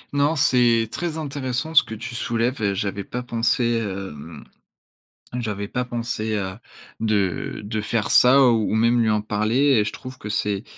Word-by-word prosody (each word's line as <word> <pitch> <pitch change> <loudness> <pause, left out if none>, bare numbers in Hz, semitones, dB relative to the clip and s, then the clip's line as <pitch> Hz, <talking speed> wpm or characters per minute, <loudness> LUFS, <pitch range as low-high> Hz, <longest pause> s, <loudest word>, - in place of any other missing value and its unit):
Non 145 +3 +2
c'est 120 -5 +3
très 170 -2 -3
intéressant 140 -1 -3
ce 155 - +8
que 110 - -8
tu 120 +2 -7
soulèves, 120 +1 -1
heu, 100 -1 +1
j'avais 100 0 -3
pas 125 +5 -5
pensé, 120 0 +1
hem, 90 -7 -7 0.9
j'avais 105 -5 -3
pas 125 +4 -2
pensé 115 -3 -3
à 95 +3 -5 0.4
de 100 -5 -1
de 110 +1 -3
faire 110 0 -1
ça. 130 +3 +6
Ou 110 -3 +1
même 115 +2 +3
lui 110 - +2
en 105 -1 +2
parler 105 +2 -1 0.2
et - - +3
je 105 - -3
trouve 130 0 -9
que 105 - -8
c'est 105 -1 -1
115 Hz, 175 wpm, -23 LUFS, 105-125 Hz, 0.9 s, ce